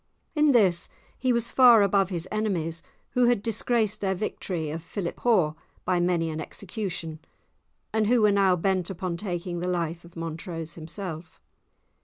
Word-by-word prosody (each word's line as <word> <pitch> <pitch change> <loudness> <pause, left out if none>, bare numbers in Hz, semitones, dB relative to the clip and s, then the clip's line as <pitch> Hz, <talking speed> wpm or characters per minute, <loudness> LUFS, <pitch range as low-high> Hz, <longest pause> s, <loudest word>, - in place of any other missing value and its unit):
In 300 -1 +4
this 195 -9 +3 0.3
he 255 -1 0
was 235 -1 0
far 240 -5 +7
above 195 -1 +2
his 175 -2 -4
enemies, 175 -7 -1 0.3
who 250 -1 +3
had 240 -4 +2
disgraced 220 -1 0
their 190 -1 0
victory 175 -5 -3
of 165 +2 -4
Philiphaugh 180 -1 0 0.3
by 180 -1 +2
many 175 -2 +1
an 155 0 -4
execution, 180 -4 -5 0.7
and 220 -1 +2
who 235 -1 +4
were 210 - +6
now 195 -2 +4
bent 185 0 0
upon 185 -2 -3
taking 175 -2 -4
the 180 - -2
life 170 -1 -2
of 170 0 -16
Montrose 165 0 -5
himself. 165 0 -7
185 Hz, 155 wpm, -26 LUFS, 170-215 Hz, 0.7 s, far